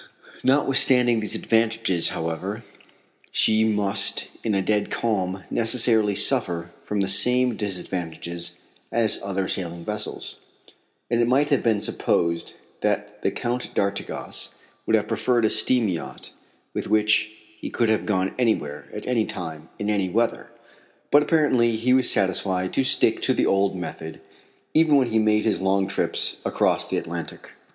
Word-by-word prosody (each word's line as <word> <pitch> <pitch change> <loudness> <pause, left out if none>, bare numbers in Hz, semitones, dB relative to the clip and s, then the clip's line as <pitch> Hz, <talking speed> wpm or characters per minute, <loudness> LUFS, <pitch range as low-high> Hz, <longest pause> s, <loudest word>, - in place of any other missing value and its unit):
Notwithstanding 130 -3 +4
these 105 - 0
advantages, 110 -6 +1
however, 90 +7 -4 0.7
she 110 0 +3
must 105 -2 +2
in 110 -3 0
a 95 - +1
dead 105 +1 0
calm 95 -4 -2
necessarily 115 -3 +3
suffer 90 -8 +1
from 105 -1 -3
the 95 - 0
same 125 +5 +5
disadvantages 85 -3 -4 0.3
as 115 -2 +3
other 95 -1 -3
sailing 85 -2 -4
vessels, 105 0 -4 0.7
and 120 0 +2
it 120 - +2
might 140 +4 +2
have 140 - +3
been 110 -3 +1
supposed 85 -4 -1 0.3
that 105 0 -2
the - - +1
Count 120 +4 -4
d'Artigas 100 0 -2 0.3
would - - +3
have - - 0
preferred 120 -3 +1
a - - +2
steam 115 +1 +3
yacht 85 -4 -5 0.4
with - - -4
which 105 0 +2 0.3
he - - -6
could 115 -2 0
have 110 - 0
gone 95 -3 0
anywhere, 75 - -1
at 105 - -8
any 120 -3 0
time, 80 -3 -6
in 105 - -4
any 100 -3 0
weather. 115 +5 -1 0.6
But 145 - +6
apparently 140 -7 +2
he 120 +3 +1
was 130 -1 +3
satisfied 95 -1 0
to 135 - +1
stick 130 - +3
to - - +2
the - - +1
old 95 0 +1
method, 80 -2 -7 0.5
even 155 -1 +4
when 130 -4 +2
he 110 - +2
made 105 0 +2
his 110 - 0
long 95 0 +1
trips 100 - 0
across - - 0
the - - -2
Atlantic. - - -6
105 Hz, 150 wpm, -23 LUFS, 95-120 Hz, 0.7 s, But